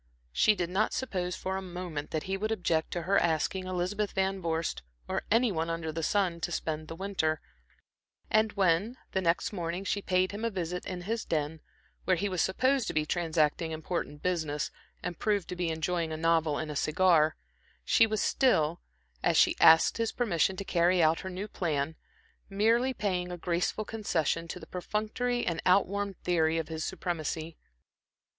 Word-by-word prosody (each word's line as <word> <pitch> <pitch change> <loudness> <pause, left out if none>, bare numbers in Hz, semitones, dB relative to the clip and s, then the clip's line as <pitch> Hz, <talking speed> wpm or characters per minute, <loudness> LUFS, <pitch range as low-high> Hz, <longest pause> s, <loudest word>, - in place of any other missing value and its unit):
She 210 - +4
did 175 -2 -2
not 210 +4 +1
suppose 180 -8 -2
for 190 0 -3
a - - -3
moment 175 -5 -5
that 155 - -2
he 190 - -2
would 215 +3 -2
object 170 -6 0
to 175 - -2
her 195 +4 +3
asking 175 +3 0
Elizabeth 185 +3 -1
Van 190 0 0
Vorst, 165 - -1 0.3
or - - -1
any 230 +1 +4
one 165 -2 -1
under 165 -1 -2
the 165 +1 -4
sun, 180 0 +1
to 175 - -2
spend 155 -2 -3
the 165 - -7
winter, 165 -5 -1 0.9
and 215 0 +3
when, 195 +5 +2
the 190 - 0
next 170 +3 +1
morning, 175 0 -3
she 200 +1 -1
paid 185 -1 +1
him 205 +2 -6
a 230 - +1
visit 180 -3 -4
in 180 -1 -4
his 220 +5 -2
den, 155 0 -2 0.5
where 185 - +4
he 200 +4 -1
was 185 -2 0
supposed 255 +7 +2
to - - -3
be 155 -1 +2
transacting 160 -1 +1
important 160 -2 -4
business, 160 -5 -1 0.3
and 175 -2 -4
proved 205 -4 0
to 180 - -3
be 175 -1 -1
enjoying 160 +1 -1
a 155 - -3
novel 160 -2 +2
and 155 -1 -3
a - - -6
cigar, 155 0 +3 0.5
she 230 - +5
was 215 -1 0
still, 170 - +2 0.4
as - - +2
she - - +5
asked 160 0 +7
his 230 -1 0
permission 190 -6 +1
to 195 - -5
carry 175 0 +3
out 160 +1 +3
her 190 - -5
new 190 +3 -5
plan, 160 -5 -2 0.5
merely 225 +6 +3
paying 185 -6 -2
a 175 - -5
graceful 175 +5 -1
concession 170 -7 -1
to 180 - -6
the - - -10
perfunctory 215 +6 -2
and 170 -1 -1
outworn 200 +1 +2
theory 165 -2 +2
of 165 -1 -3
his 160 -1 -3
supremacy. 165 -3 -3
180 Hz, 185 wpm, -30 LUFS, 160-200 Hz, 0.9 s, asked